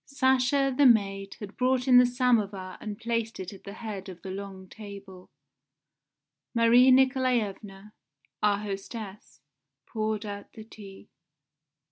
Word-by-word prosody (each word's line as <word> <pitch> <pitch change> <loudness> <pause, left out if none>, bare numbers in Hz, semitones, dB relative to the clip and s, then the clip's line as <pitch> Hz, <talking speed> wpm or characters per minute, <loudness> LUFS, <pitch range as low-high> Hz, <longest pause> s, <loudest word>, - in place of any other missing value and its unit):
Sasha, 270 0 +1
the 280 0 +6
maid, 195 -4 +1
had 205 -1 -9
brought 255 0 +1
in 250 -1 +8
the 250 - +5
samovar 215 -7 0
and 210 -2 -6
placed 230 0 -3
it 185 +1 -6
at 195 - -15
the 200 - -8
head 205 -4 -7
of 180 -2 -12
the 190 - -6
long 190 -1 -8
table. 200 -3 -11 1.3
Marie 235 +2 +6
Nikolaevna, 235 -6 +1 0.5
our 205 -1 +3
hostess, 195 - -8 0.4
poured 215 -1 -3
out 205 -1 -8
the 220 - -10
tea. 205 -3 -13
215 Hz, 130 wpm, -27 LUFS, 195-245 Hz, 1.3 s, in